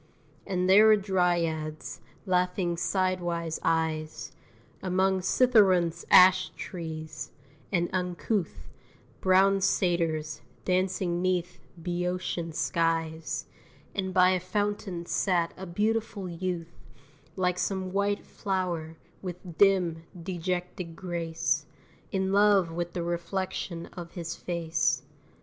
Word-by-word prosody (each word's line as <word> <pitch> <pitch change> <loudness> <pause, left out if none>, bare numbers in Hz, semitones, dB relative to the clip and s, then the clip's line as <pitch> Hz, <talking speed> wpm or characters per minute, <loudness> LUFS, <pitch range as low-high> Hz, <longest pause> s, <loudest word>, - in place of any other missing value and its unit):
And 185 -1 0
there 205 +3 +7
were 215 - +8
Dryads, 175 -6 -1 0.2
laughing 180 -1 +1
sidewise 175 -3 -1
eyes, 155 -6 -1 0.5
Among 190 +1 +2
Cithæron's 185 -5 +3
ash 185 0 +7
trees; 160 -3 -6 0.4
and 175 -2 +2
uncouth 180 +1 -2 0.5
Brown 195 +1 +4
Satyrs, 170 -6 0 0.2
dancing 185 -1 0
'neath 180 -1 -1 0.2
Bœotian 175 0 -2
skies; 165 -1 -1 0.5
And 190 -1 -2
by 185 0 +5
a 185 - +2
fountain 190 -1 -2
sat 175 -2 +1
a 190 - -8
beautiful 210 +1 -1
youth, 170 -1 -4 0.6
Like 180 -1 0
some 190 -1 -2
white 200 +1 0
flow'r, 180 -5 -3 0.3
with 180 -2 -8
dim, 180 -5 +3
dejected 180 -1 -4
grace, 165 -4 -2 0.4
In 190 0 0
love 200 -4 +4
with 175 +1 -3
the 175 - -2
reflection 170 0 -3
of 170 -1 -8
his 170 -2 -5
face. 170 -2 0
180 Hz, 100 wpm, -28 LUFS, 170-190 Hz, 0.6 s, were